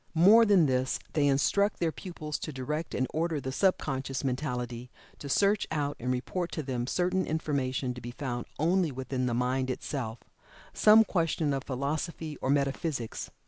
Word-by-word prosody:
More 205 +8 +7
than 195 -6 +5
this, 130 -1 +1 0.2
they 150 -2 +3
instruct 200 +9 +2
their 165 -2 +1
pupils 155 -4 -6
to 155 - -5
direct 150 +4 -4
and 130 - +1
order 160 -1 0
the 130 -1 -4
sub 190 +7 +3
conscious 135 -1 -3
mentality 125 -3 -3 0.3
to 140 - -7
search 200 +7 +2
out 145 -2 -1
and 125 +2 -1
report 170 +8 -2
to 155 - -3
them 125 -3 -3
certain 180 +4 0
information 135 -5 -1
to 125 - -9
be 120 - -6
found 120 -1 -4
only 170 +1 +2
within 130 0 -2
the 120 - 0
mind 130 +2 0
itself 125 -3 -3 0.6
some 215 +1 +7
question 165 -6 0
of 135 0 -3
philosophy 150 +4 -3
or - - -1
metaphysics. 140 -3 -1
140 Hz, 170 wpm, -29 LUFS, 130-165 Hz, 0.6 s, More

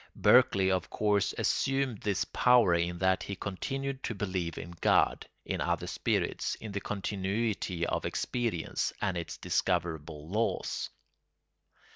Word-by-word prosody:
Berkeley 95 -1 +5
of 90 -2 0
course 105 -2 +1
assumed 135 -5 +1
this 100 -3 0
power 125 -7 +4
in 85 +1 0
that 95 +1 +2
he 100 - -4
continued 135 +8 -4
to 120 - -3
believe 95 -4 -2
in 85 - -6
God, - - +3 0.2
in - - -2
other - - 0
spirits, - - -1
in 110 - -8
the 100 0 -3
continuity 100 -2 -2
of - - -1
experience, 115 -9 -1
and 95 - 0
in 85 - -1
its - - -8
discoverable 80 -4 -1
laws. 110 +6 -1
95 Hz, 135 wpm, -30 LUFS, 85-110 Hz, 0.2 s, Berkeley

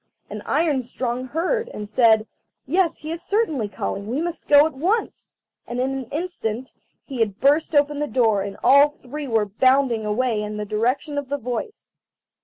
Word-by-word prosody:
And - - -5
Iron 305 -5 +1
strong 250 0 -4
heard, 370 - -1
and 210 - -7
said: 220 0 +4 0.4
"Yes, 345 +5 +1
he 310 - -7
is 330 +1 -4
certainly 315 - 0
calling, 200 0 -4
we 250 +6 -2
must 345 +1 -4
go 290 0 +7
at 320 - -2
once." 370 - -2 0.3
And 240 +1 -4
in 260 +1 0
an 270 -1 -4
instant 260 -6 -4 0.3
he 265 -4 -7
had 210 -2 0
burst 295 +3 +2
open 290 0 +3
the 295 - -1
door, 220 -5 +2
and 200 0 -5
all 285 +2 +6
three 285 +3 -6
were 225 -3 +2
bounding 255 +2 +2
away 215 +1 0
in 210 0 -5
the 210 - -3
direction 250 +8 -1
of 280 -2 -8
the 285 - -1
voice. 250 - -6
265 Hz, 185 wpm, -22 LUFS, 225-300 Hz, 0.4 s, go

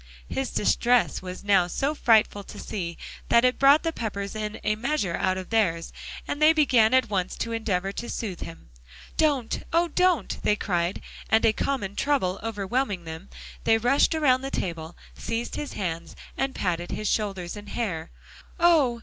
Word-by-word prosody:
His 265 -1 -2
distress 240 +3 +2
was 185 0 -7
now 200 -3 +4
so 275 - -1
frightful 220 -7 +3
to - - -11
see, 170 -5 -5 0.3
that 235 +1 +5
it 250 - +2
brought 280 +3 +6
the 330 -1 -1
Peppers 200 -5 -4
in 215 0 -4
a 215 - +1
measure 230 - -1
out 185 0 0
of 185 +2 -7
theirs; 175 -7 +1 0.3
and 290 - -3
they 310 +1 +7
began 250 -8 +4
at 260 -5 +2
once 185 -2 -1
to 230 - -3
endeavor 195 -4 -1
to 235 +4 -6
soothe 195 -6 -4
him. 165 - -10 0.4
"Don't 285 -7 +1
oh! 335 +1 +2
don't," 360 -1 +1
they 210 - +2
cried, 175 -3 -1 0.3
and 220 +1 +4
a 220 - +4
common 210 -6 -2
trouble 205 -11 0
overwhelming 205 -1 -2
them, 160 +3 -8 0.3
they 225 - +4
rushed 250 +7 +3
around 260 -5 +3
the 270 - -4
table, 165 -7 -4 0.2
seized 230 +1 -4
his 295 - -5
hands, 170 -3 -4 0.2
and 270 0 -2
patted 175 -2 -2
his 215 - -3
shoulders 195 -5 -1
and 205 0 -10
hair. 175 -9 -3 0.5
"Oh! 305 -9 +4
220 Hz, 175 wpm, -26 LUFS, 185-265 Hz, 0.5 s, they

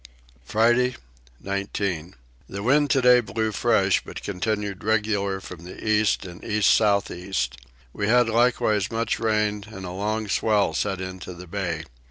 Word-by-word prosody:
Friday 120 - +2 0.5
19. 100 -4 -3 0.3
The 100 +1 -5
wind 145 +5 +3
today 125 -2 +5
blew 110 0 -2
fresh 100 -4 +2
but - - -9
continued 100 0 -3
regular 105 -3 0
from 90 -3 -10
the 90 +4 -9
east 110 -2 +2
and 90 +1 -10
east 105 -2 +3
south 100 -2 +3
east. 70 -10 -3 0.4
We 105 - -2
had 120 +1 +4
likewise 115 -3 +2
much 115 +1 -1
rain 105 -2 0
and 95 -4 -8
a 90 - -5
long 105 +3 -2
swell 105 -3 +2
set 95 +1 -1
into 95 -1 -7
the 90 +1 -10
bay. 85 -3 -3
105 Hz, 150 wpm, -24 LUFS, 95-110 Hz, 0.5 s, today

